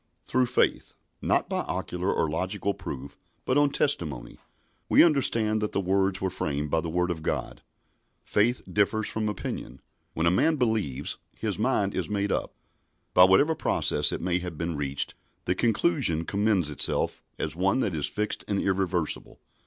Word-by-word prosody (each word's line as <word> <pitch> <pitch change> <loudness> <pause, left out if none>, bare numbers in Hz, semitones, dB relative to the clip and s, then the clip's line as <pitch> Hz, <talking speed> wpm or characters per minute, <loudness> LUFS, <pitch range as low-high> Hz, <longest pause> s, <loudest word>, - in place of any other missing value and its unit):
"Through 130 0 +1
faith" - - 0 0.3
not - - +2
by - - -2
ocular 90 +2 -2
or - - +1
logical 95 +6 -2
proof, 70 -8 -8 0.3
but 130 - +1
on 145 0 +4
testimony 85 - -1 0.5
"we - - +7
understand 115 -9 +3
that 105 - -2
the - - +1
worlds 95 0 +1
were 95 -1 -1
framed 75 -4 -3
by 80 - +2
the 85 - -4
Word 90 +2 0
of 80 -2 -5
God." - - -3 0.6
Faith 120 +4 +1
differs 105 +1 +1
from 110 -1 -2
opinion. 105 - -5 0.4
When 80 - 0
a 85 - +4
man 155 - +3
believes 110 - -1 0.2
his 105 -3 -2
mind 105 -4 +1
is - - -2
made 100 -1 -1
up. - - -2 0.6
By 90 - +8
whatever 95 +13 +4
process - - +1
it - - -4
may 90 0 0
have 90 -3 -6
been 85 0 -3
reached, 70 -1 -2 0.3
the 90 - +2
conclusion 115 - +1
commends 100 -6 +1
itself 75 - +1 0.2
as - - -2
one 95 +8 +1
that 105 -7 -1
is 75 -3 +1
fixed 105 0 -3
and 100 -2 0
irreversible. 95 -4 -1
95 Hz, 170 wpm, -27 LUFS, 85-110 Hz, 0.6 s, By